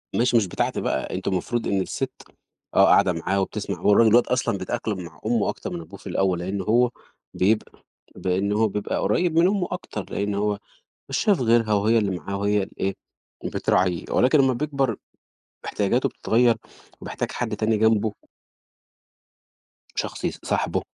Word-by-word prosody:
ماشي 120 0 +3
مش 105 -4 +2
بتاعتي - - -1
بقى، 65 - -2
أنتم - - -2
المفروض 115 +6 -1
إن 95 -1 +1
السِت - - -3 0.6
آه، - - +7
قاعدة 90 - +5
معاه 95 +4 -1
وبتسمَع 100 +2 -4
وهو - - +3
الراج 115 +2 +6
الواد - - +6
دلوقتي - - -2
أصلًا 125 -5 0
بيتأقلم 105 +1 -3
مع 80 -2 -12
أُمه 110 -2 +1
أكتر - - -5
من 85 - -4
أبوه 80 - -12
في - - -11
الأول، 95 -2 +1
لإن 95 +3 -3
هو 120 +5 +3 0.4
بيبقى 105 +4 0 0.3
لإن 95 +2 -1
هو 110 +1 +3
بيبقى 105 0 -3
قُريب 165 - +2
من 170 - +5
أُمه 195 -2 0
أكتر، 145 - -5
لإن 100 0 -2
هو 105 0 0 0.5
مش - - -1
شايف 200 -7 +2
غِيرها 115 -2 +3
وهي 110 +3 +3
اللي 105 -3 0
معاه 100 +1 -5
وهي 100 0 +1
اللي 95 - -7
إيه 95 0 0 0.5
بتراعيه، 90 -2 +1
ولكن 130 +4 +4
لمّا 135 -1 +4
بيكْبر 135 -4 -1 0.7
احتياجاته 105 +5 +1
بتتغير 120 +1 +2 0.5
وبيحتاج - - -4
حد 115 -3 -3
تاني 110 +1 +1
جنبه. 110 0 +2 1.8
شخص - - -4
يصاحبه. - - -1
105 Hz, 165 wpm, -24 LUFS, 95-120 Hz, 1.8 s, آه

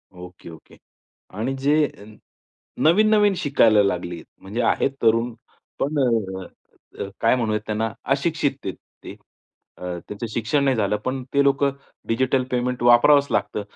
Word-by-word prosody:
Okay, 90 -1 -12
okay. 80 - -15 0.6
आणि 130 +5 -2
जे 145 +3 +2 1.0
नवीन-नवीन 210 +4 +4
शिकायला 115 -9 +4
लागले. 90 -3 -3 0.2
म्हणजे 105 +6 -3
आहेत 125 - +1
तरुण. 115 +1 +2 0.5
पण 145 +3 -1 1.3
काय 115 +3 +3
म्हणूयात 110 -3 -1
त्यांना 110 0 -2 0.2
अशिक्षित 150 0 -1
आहेत 95 - -4 0.3
ते. - - -7 0.6
अ, - - -16 0.3
त्यांचं 105 +3 -5
शिक्षण 140 +6 0
नाही 135 -2 +2
झालं. 105 -1 0
पण 130 0 -2
ते 140 - +4
लोकं 140 0 +2 0.4
डिजिटल 130 +2 +1
पेमेंट 125 0 -1
वापरावंच 130 +4 +6
लागतं. 105 0 -1
120 Hz, 125 wpm, -22 LUFS, 105-140 Hz, 1.3 s, वापरावंच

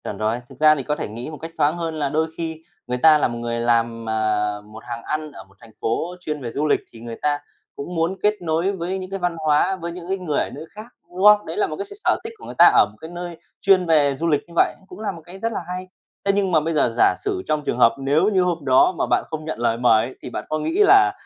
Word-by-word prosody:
Chuẩn 100 - -5
rồi. 110 +3 -1
Thực - - -15
ra 155 0 +6
thì 140 - -4
có 150 +3 -1
thể - - -4
nghĩ 115 +6 -7
một 155 - -8
cách 165 +3 -8
thoáng 150 +2 +2
hơn 165 -2 -3
là 145 -2 0
đôi 160 +3 +1
khi 160 -1 -4 0.3
người 125 0 -1
ta 155 +4 +6
là - - +2
một 120 -1 -5
người 115 0 -3
làm, 115 -1 0
à, 110 -1 +1
một 105 +1 -13
hàng 120 -1 -6
ăn 155 0 -3
ở - - -11
một 95 0 -25
thành 115 -1 -15
phố 165 +10 -1
chuyên 150 -4 -4
về 120 -2 -5
du 150 +5 -1
lịch, - - +3
thì 115 - -13
người 115 0 -7
ta 145 -1 +1 0.4
cũng 175 +6 -6
muốn 170 +3 0
kết 210 0 +4
nối 170 +3 0
với 185 0 -3
những 185 -1 -6
cái 195 0 -4
văn 175 -2 -1
hóa, 155 +5 +3
với 170 +1 -4
những 175 0 -9
cái 195 - 0
người 165 -6 -1
ở - - -1
nơi - - -9
khác, 215 +1 -9 0.2
đúng 180 +2 -5
không? 210 0 +7
Đấy - - -6
là 400 -1 +2
một - - -5
cái 395 - -5
s - - -19
s - - -9
sở - - +3
thích 445 +1 -7
của 430 - -13
người - - -8
ta - - +9
ở - - +7
một - - -22
cái 160 - -8
nơi 175 -1 -7 0.2
chuyên 190 -2 +4
về 150 -4 +3
du 165 +5 -2
lịch 145 -3 +2
như 170 - -15
vậy, - - +3
cũng 180 +1 -12
là 215 -2 -2
một 170 -3 -11
cái 180 +2 -11
rất 230 +2 -1
là - - -2
hay. 180 +1 -5 0.4
Thế 200 - +4
nhưng 195 -2 +1
mà 160 - +5
bây 160 +2 -2
giờ 145 -6 +2
giả - - +5
sử 400 -2 -1
trong 155 -1 0
trường 120 - -1
hợp 115 - +5
nếu 145 +8 +2
như 190 - +4
hôm 170 -4 -2
đó 130 +7 +5
mà - - +1
bạn - - +2
không 155 -1 -5
nhận 155 -6 -4
lời 115 -1 +1
mời 115 -2 +4
ấy, 130 - -9
thì - - -7
bạn - - -5
có 155 - -1
nghĩ 240 - -2
là 390 0 +6
155 Hz, 305 wpm, -22 LUFS, 125-180 Hz, 0.4 s, ta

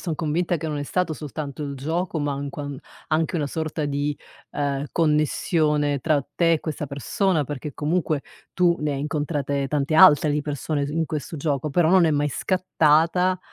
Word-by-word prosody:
son 165 -4 -3
convinta 170 +3 0
che 160 0 -5
non 150 -2 -3
è - - -2
stato 170 +3 -1
soltanto 150 -1 -6
il 140 -1 -5
gioco 165 +5 -2
ma, 145 -1 -1
anquan 140 0 -5 0.3
anche 160 +2 0
una 150 - 0
sorta 155 +1 -3
di, 145 0 -2 0.3
ehm, 140 0 -2
connessione 150 -2 +1
tra 155 0 +2
te 170 -1 +3
e 155 - -2
questa 150 -2 -4
persona, 150 - 0
perché 145 +1 -6
comunque 155 -1 -1 0.3
tu 175 -2 +3
ne 150 -1 -1
hai 135 - -3
incontrate 145 -2 -2
tante 150 +1 0
altre 155 -3 +7
di 150 - +1
persone 145 0 -2
su 145 - -5
in 165 +1 0
questo 155 +2 -5
gioco, 145 0 -1
però 160 +3 +3
non 185 0 +5
è 160 - +3
mai 145 0 +1
scattata, 180 +1 +2
150 Hz, 180 wpm, -24 LUFS, 145-165 Hz, 0.3 s, altre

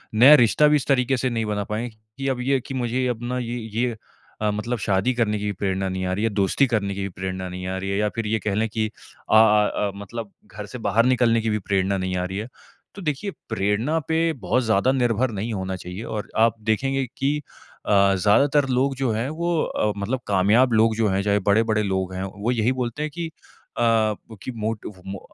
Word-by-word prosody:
नया 130 +7 +9
रिश्ता 150 +7 +4
भी 150 - +4
इस 145 - -1
तरीके 130 -1 +2
से 130 +1 0
नहीं 115 -2 -1
बना 105 -1 -1
पाएँगे 110 +3 -4 0.2
कि 135 0 -3
अब 130 -2 -1
ये 135 +3 +1
है 135 - +3
कि 135 - -8
मुझे 125 0 -1
अब 120 -2 -2
ना 125 +1 -2
ये 120 0 -3 0.2
ये 120 -2 0 0.4
अ, 105 - +2
मतलब 115 +4 -2
शादी 105 +4 +1
करने 110 -3 0
की 105 0 -2
प्रेरणा 95 0 -2
नहीं 95 0 -3
आ 90 - -1
रही 100 +3 -2
है, 115 - +2
दोस्ती 100 +6 +2
करने 105 -5 -1
की 100 - -4
भी 100 - -2
प्रेरणा 95 0 -5
नहीं 90 +1 -6
आ 95 0 -2
रही 95 +1 -4
है 100 - 0
या 105 0 +1
फिर 115 -2 -2
ये 110 +1 0
कह 105 -1 -2
लें 110 +2 +1
कि 110 0 -1
अ 110 - -5
अ 105 -1 +6
अ, 100 -1 0
मतलब 100 +1 -7 0.2
घर 105 +2 -7
से 125 - -8
बाहर 115 +2 +3
निकलने 120 -3 +3
की 110 - -1
भी 105 0 0
प्रेरणा 95 0 0
नहीं 95 -1 -2
आ 90 - -1
रही 95 +1 -4
है। 110 +3 -4 0.5
तो 200 - -8
देखिए 160 +5 -2 0.2
प्रेरणा 110 +8 0
पे 165 0 +1
बहुत 125 - 0
ज़्यादा 110 +2 +2
निर्भर 125 -2 +1
नहीं 110 +3 -3
होना 95 -2 -3
चाहिए 90 +3 -7
और 110 -1 -5
आप 115 +1 +4
देखेंगे 135 +4 +1
कि 140 +2 +1 0.5
अ, - - -5 0.3
ज़्यादातर 135 +9 +3
लोग 130 +2 +1
जो 130 -2 0
हैं 110 +3 -1
वो 170 +3 -1
अ, 105 - 0
मतलब 110 +6 -2
कामयाब 105 +6 +3
लोग 110 0 +4
जो 110 -1 +1
हैं, 95 +1 +1
चाहे 100 0 +2
बड़े-बड़े 110 +1 +3
लोग 95 -2 -1
हैं 95 +1 -3
वो 105 +4 -3
यही 120 0 +1
बोलते 120 +4 -3
हैं 155 - -3
कि 170 -1 -3
अ, 160 - -12 1.1
कि - - -4
मोटिव 105 -3 -4
मो 95 0 -5
110 Hz, 230 wpm, -23 LUFS, 100-125 Hz, 1.1 s, नया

